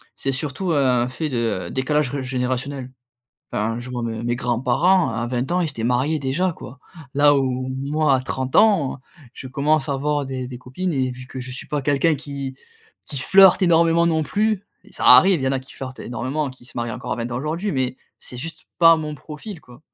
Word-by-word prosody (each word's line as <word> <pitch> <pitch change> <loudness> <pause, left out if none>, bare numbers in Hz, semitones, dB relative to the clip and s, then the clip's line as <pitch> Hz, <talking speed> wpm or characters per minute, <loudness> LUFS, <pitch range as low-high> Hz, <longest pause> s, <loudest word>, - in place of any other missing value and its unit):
c'est 135 - -1
surtout 150 +6 -2
un 130 -5 +2
fait 150 +5 -3
de 115 -9 -1
décalage 135 +1 0
réj 140 -2 -3
générationnel. 130 +1 -3 0.6
Hein, 115 +2 -1
je 120 +1 -8
vois 125 -1 -4
mes 115 0 -4
mes 120 0 0
grands-parents, 130 +9 +2
à 115 +1 -2
20 125 +4 -2
ans, 180 - +2
ils 170 - 0
s'étaient 115 -6 -4
mariés 130 +6 +1
déjà, 150 +7 0
quoi. 140 -3 -11 0.3
Là 145 0 +5
où, 130 -1 -1
moi, 145 0 +2
à - - -2
30 130 0 -3
ans, 195 -12 +4 0.4
je - - -8
commence 145 +2 +1
à - - +1
avoir 145 +1 -1
des 130 -1 -4
des 125 -1 -8
copines 150 +9 -4
et 130 -3 0
vu 125 +1 -10
que 130 - -7
je 130 0 -7
suis 130 - -8
pas 150 -1 -1
quelqu'un 145 +3 +2
qui 140 -2 -6 0.5
qui 140 - -4
flirte 190 +7 +6
énormément 170 -1 +4
non 160 -2 +1
plus 210 +2 0 0.2
et - - -20
ça - - -5
arrive, 190 -4 +7
il - - -2
y - - +2
en - - 0
a 135 - -1
qui 130 - -15
flirtent 130 -1 -8
énormément, 135 +4 -3
qui 130 -1 -16
se 125 - -13
marient 120 -1 -2
encore - - -5
à - - -2
20 115 +1 -4
ans - - -2
aujourd'hui, 165 +9 -2
mais 130 -2 -1 0.2
c'est 125 - -9
juste 160 +6 -7
pas 165 -1 +7
mon 155 -1 -4
profil, 160 +6 -9
quoi. 125 -2 -17
135 Hz, 220 wpm, -22 LUFS, 125-155 Hz, 0.6 s, arrive